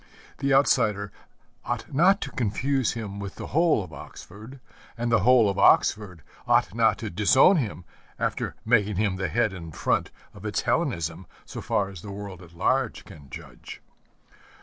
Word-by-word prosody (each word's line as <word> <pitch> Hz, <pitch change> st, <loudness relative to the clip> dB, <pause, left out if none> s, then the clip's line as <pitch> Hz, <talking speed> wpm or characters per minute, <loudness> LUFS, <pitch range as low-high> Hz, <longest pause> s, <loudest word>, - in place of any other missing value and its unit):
The 140 Hz, 0 st, 0 dB
outsider 110 Hz, -7 st, +2 dB, 0.5 s
ought -, -, -5 dB
not 185 Hz, +8 st, +4 dB
to 135 Hz, -, -5 dB
confuse 130 Hz, +3 st, -1 dB
him 105 Hz, -4 st, -6 dB
with 100 Hz, -1 st, -7 dB
the -, -, -7 dB
whole 160 Hz, -, +3 dB
of 85 Hz, -4 st, -12 dB
Oxford, 110 Hz, -, -11 dB, 0.4 s
and 120 Hz, 0 st, -2 dB
the 115 Hz, -, +4 dB
whole 125 Hz, -3 st, +5 dB
of 100 Hz, 0 st, -2 dB
Oxford 95 Hz, -5 st, +3 dB, 0.2 s
ought -, -, +2 dB
not -, -, +2 dB
to -, -, -6 dB
disown 120 Hz, -, +5 dB
him 100 Hz, -, -3 dB, 0.3 s
after -, -, -3 dB
making 105 Hz, -3 st, +2 dB
him 100 Hz, -1 st, 0 dB
the 95 Hz, -2 st, -2 dB
head 110 Hz, +4 st, 0 dB
and 85 Hz, -4 st, -9 dB
front -, -, 0 dB, 0.2 s
of 105 Hz, -2 st, -14 dB
its 105 Hz, -1 st, -2 dB
Hellenism 90 Hz, -, -2 dB, 0.2 s
so -, -, -8 dB
far 100 Hz, -, 0 dB
as 95 Hz, -4 st, -10 dB
the 105 Hz, -, -9 dB
world 100 Hz, -2 st, -8 dB
at 85 Hz, -1 st, -15 dB
large 130 Hz, +6 st, 0 dB
can 70 Hz, -3 st, -14 dB
judge. -, -, -11 dB
105 Hz, 170 wpm, -25 LUFS, 95-125 Hz, 0.5 s, whole